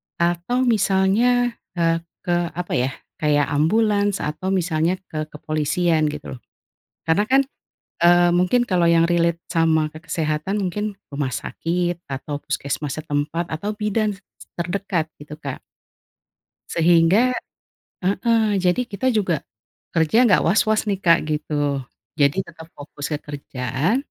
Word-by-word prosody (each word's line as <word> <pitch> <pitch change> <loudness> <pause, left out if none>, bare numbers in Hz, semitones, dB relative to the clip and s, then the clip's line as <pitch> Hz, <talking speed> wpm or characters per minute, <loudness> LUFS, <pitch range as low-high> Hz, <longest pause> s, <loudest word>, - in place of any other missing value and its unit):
atau 175 +9 0
misalnya, 230 +3 +3 0.2
eee, 165 -1 +2 0.2
ke 175 - +1 0.2
apa 180 0 -4
ya, 130 +2 0 0.3
kayak 145 -1 +2
ambulans 205 +6 +2
atau 155 +6 -2
misalnya 170 -1 +1 0.2
ke 155 -1 -3
kepolisian 155 +2 0
gitu 150 -2 -7
loh. - - -13 0.7
Karena 160 +6 +3
kan, 270 +1 +5 0.6
eee, 175 0 +6
mungkin 180 +8 +3
kalau 180 -7 +2
yang 165 0 +5
relate 170 -1 +2
sama 160 -2 +2
ke 155 - -10
kesehatan, 155 +6 -1
mungkin 205 +3 -2 0.2
rumah 140 -2 -2
sakit 175 +1 -2
atau 140 +2 -5
puskesmas 140 0 -3
setempat, 155 +3 -2
atau 200 +7 -3
bidan 210 0 0 0.4
terdekat 175 -1 -1
gitu 150 +1 -9
Kak. 140 -4 -5 1.2
Sehingga 170 +8 +4 0.7
heeh, 210 +2 +2
jadi 180 +5 +2
kita 240 +2 -3
juga 180 -7 +1 0.6
kerja 165 +5 +3
nggak 200 - +4
waswas 215 +4 +3
nih 200 -2 0
Kak, 170 -1 +6
gitu. 150 0 -3 0.7
Jadi 140 +2 +3
tetap 160 -1 -12
fokus 145 0 -7
ke 150 - 0
kerjaan, 140 - -1
170 Hz, 125 wpm, -22 LUFS, 155-200 Hz, 1.2 s, eee